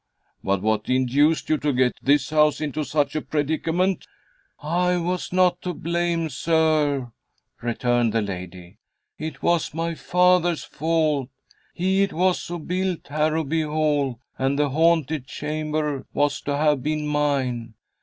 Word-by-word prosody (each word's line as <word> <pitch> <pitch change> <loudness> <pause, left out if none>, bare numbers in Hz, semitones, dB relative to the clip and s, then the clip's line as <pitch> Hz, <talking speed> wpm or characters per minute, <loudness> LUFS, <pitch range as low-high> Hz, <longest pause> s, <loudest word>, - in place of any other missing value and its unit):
"But 100 0 0
what 110 -1 0
induced 130 +5 +2
you 155 - +1
to 150 - 0
get 125 -1 +2
this 140 +1 +2
house 150 -1 +3
into 155 0 -2
such 145 0 0
a 155 - 0
predicament?" 160 +5 -1 0.5
"I 180 +4 +1
was 180 +1 -2
not 180 -1 +3
to 180 -2 -4
blame, 170 0 -1
sir," 150 -3 +1 0.5
returned 120 0 +1
the 110 0 +1
lady. 90 0 -8 0.4
"It 155 +1 -6
was 170 -3 +1
my 165 +1 -1
father's 180 0 +2
fault. 155 -4 0 0.5
He 190 +2 +1
it 200 0 +1
was 180 +2 +1
who 175 - -4
built 180 +1 -3
Harrowby 155 +1 0
Hall, 150 -5 0 0.2
and 135 +1 +1
the 145 -1 +2
haunted 160 -2 +2
chamber 150 -1 -3
was 145 +1 +1
to 145 -1 0
have 150 -2 +2
been 150 +1 -1
mine. 135 -6 -1
150 Hz, 140 wpm, -23 LUFS, 135-165 Hz, 0.5 s, house